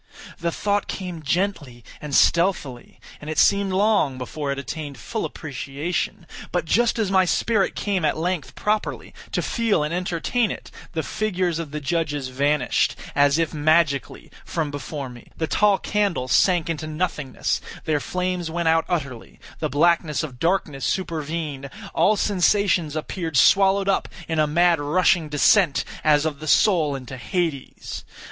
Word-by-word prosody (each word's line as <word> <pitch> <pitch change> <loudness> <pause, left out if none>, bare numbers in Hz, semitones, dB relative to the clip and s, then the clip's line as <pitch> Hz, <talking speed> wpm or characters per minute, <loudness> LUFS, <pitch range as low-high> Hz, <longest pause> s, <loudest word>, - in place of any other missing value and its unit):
The 170 0 -1
thought 205 +3 -1
came 180 -4 -5
gently 150 - -2 0.2
and 150 -2 -3
stealthily, 170 -8 +1 0.2
and 150 - -7
it 155 - -4
seemed 200 -1 +4
long 195 -8 +2
before 140 +3 -4
it 140 - -3
attained 145 0 -6
full 105 - -4
appreciation; 160 +5 -4 0.3
but 175 -2 -1
just 235 +9 +2
as 210 -4 0
my 190 -1 +5
spirit 200 +2 +1
came 195 -4 -1
at 150 - +1
length 170 -2 -2
properly 210 0 -2 0.2
to - - -1
feel 225 -9 +1
and 150 +2 -2
entertain 180 +6 0
it, - - -7 0.2
the 160 - -1
figures 180 -3 -1
of 165 -3 -5
the 150 +1 -4
judges 145 -3 -2
vanished, 145 +3 +1 0.2
as 145 +1 +4
if 165 -2 0
magically, 155 -2 +1
from 155 -3 -3
before 145 0 -5
me; 120 -2 -12
the 160 - 0
tall 200 +6 +3
candles 195 -13 -1
sank 175 -4 +3
into 155 -2 -3
nothingness; 150 -4 -2 0.2
their 155 -2 +1
flames 180 +1 -2
went 170 0 -2
out 160 0 +3
utterly; 140 -9 -4 0.2
the 155 - -1
blackness 155 0 +2
of 130 -6 -7
darkness 165 -5 0
supervened; 155 -5 -3 0.2
all 215 - +4
sensations 185 -5 +2
appeared 160 -1 -3
swallowed 195 +3 +5
up 195 - +1 0.2
in 160 -1 -1
a 155 - +3
mad 170 +2 +3
rushing 160 +2 +2
descent 150 +2 +3 0.2
as 150 0 +4
of 150 -3 -2
the 155 - -7
soul 155 -4 +3
into 130 -1 -7
Hades. 165 - -3
160 Hz, 155 wpm, -23 LUFS, 145-185 Hz, 0.3 s, my